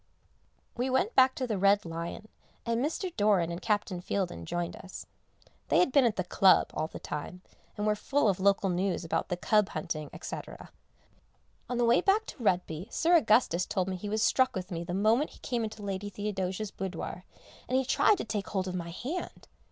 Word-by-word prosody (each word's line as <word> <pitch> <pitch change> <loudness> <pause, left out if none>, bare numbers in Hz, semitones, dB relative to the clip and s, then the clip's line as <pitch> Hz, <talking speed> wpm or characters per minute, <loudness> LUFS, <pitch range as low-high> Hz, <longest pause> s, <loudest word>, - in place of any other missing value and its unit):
We 250 +2 -1
went 365 - +1
back 260 0 +5
to 260 - -2
the 215 -5 -2
"Red 200 +1 +4
Lion" 170 +5 -6 0.4
and 235 +1 0
Mr. 340 +4 -3
Doran 200 -5 +2
and 170 - -5
Captain 205 -4 -1
Fieldin 180 - -3
joined 175 -1 -3
us. 190 - -9 0.6
They - - +3
had 355 - +4
been 275 -1 +5
at 230 - +2
the 185 - -1
Club 185 +1 +4
all 155 - -1
the - - -9
time, 165 +5 -6 0.3
and 210 - -1
were 210 - +3
full 250 +5 +1
of 195 -2 +1
local 195 0 +3
news 180 0 -1
about 165 +1 -1
the 180 - -1
cub 210 +2 +2
hunting, 155 -4 -4
&c. - - -5 1.3
On 245 - -2
the 240 - +3
way 235 +1 +4
back 420 +3 +3
to 250 - -9
Retby 180 0 0
Sir 340 +2 +3
Augustus 215 - +3
told 185 -1 -1
me 190 - -2
he 205 +3 -6
was 215 +1 0
struck 260 +3 +3
with 185 0 -5
me 170 -1 -3
the 175 +1 -4
moment 220 +9 +3
he - - -17
came 240 -3 -2
into 215 -1 -6
Lady 200 0 -3
Theodosia's 205 0 -3
boudoir, 180 -1 -5 0.5
and 255 - +2
he 265 - +1
tried 410 +10 +4
to - - -4
take 205 -2 -3
hold 190 -2 -2
of 185 - -3
my 170 -2 -4
hand. 270 - -6
205 Hz, 205 wpm, -29 LUFS, 180-240 Hz, 1.3 s, back